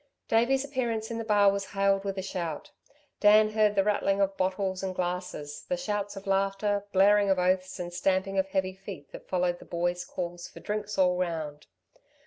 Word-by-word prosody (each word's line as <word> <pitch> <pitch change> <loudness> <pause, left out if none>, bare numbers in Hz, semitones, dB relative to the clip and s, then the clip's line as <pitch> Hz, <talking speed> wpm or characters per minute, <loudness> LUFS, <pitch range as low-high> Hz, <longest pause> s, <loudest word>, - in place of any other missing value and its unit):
Davey's 265 +4 +2
appearance 235 -5 -2
in 230 - -3
the - - -3
bar 205 -2 +4
was 200 0 -2
hailed 195 0 +2
with 195 -1 -3
a 190 - -2
shout. 175 -5 -4 0.5
Dan 215 +1 +6
heard 215 -1 +3
the 195 - +4
rattling 200 -1 +1
of 195 0 +1
bottles 185 0 -1
and 190 -1 -3
glasses, 175 -5 -4
the 270 - 0
shouts 205 -5 -3
of 195 - -9
laughter, 195 +1 0
blaring 200 +1 +5
of 190 - +3
oaths 185 +1 0
and 175 0 -5
stamping 190 +2 0
of 190 - +1
heavy 190 -1 -1
feet 190 -6 -10
that - - -11
followed 180 -1 0
the - - -13
boy's 175 +1 -1
call 175 -1 -5
for 175 - -10
drinks 210 0 -4
all 180 -1 +3
round. 160 -4 -3
195 Hz, 190 wpm, -28 LUFS, 180-205 Hz, 0.5 s, Dan